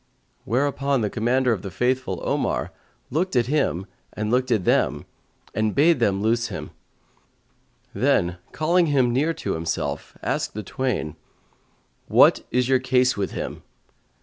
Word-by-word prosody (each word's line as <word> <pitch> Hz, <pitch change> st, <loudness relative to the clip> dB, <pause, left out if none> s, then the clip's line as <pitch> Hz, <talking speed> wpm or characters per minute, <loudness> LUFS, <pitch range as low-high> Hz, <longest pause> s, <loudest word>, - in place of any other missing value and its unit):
Whereupon 140 Hz, +1 st, 0 dB
the 105 Hz, -, -1 dB
Commander 125 Hz, +2 st, +2 dB
of 100 Hz, -, -4 dB
the 100 Hz, -, -6 dB
Faithful, 125 Hz, -3 st, -1 dB
Omar, -, -, -1 dB, 0.4 s
looked 170 Hz, +4 st, -1 dB
at 120 Hz, -2 st, +3 dB
him 125 Hz, -, 0 dB, 0.3 s
and 105 Hz, +2 st, -2 dB
them 125 Hz, -6 st, +1 dB, 0.5 s
and 110 Hz, -1 st, 0 dB
bade 155 Hz, +1 st, +4 dB
them 100 Hz, -4 st, +1 dB
loose 115 Hz, +2 st, +1 dB
him; -, -, -7 dB, 1.2 s
then, 85 Hz, 0 st, +1 dB
calling 170 Hz, +3 st, +2 dB
him 130 Hz, -5 st, +2 dB
near 145 Hz, +6 st, +2 dB
to -, -, -3 dB
himself, 80 Hz, 0 st, -3 dB
asked -, -, -2 dB
the 105 Hz, -, -4 dB
twain, 100 Hz, -, -3 dB, 0.9 s
"What -, -, +5 dB
is 125 Hz, 0 st, +1 dB
your 130 Hz, -1 st, +3 dB
case 130 Hz, 0 st, +2 dB
with 100 Hz, -1 st, -3 dB
him?" -, -, -5 dB
125 Hz, 135 wpm, -23 LUFS, 105-135 Hz, 1.2 s, What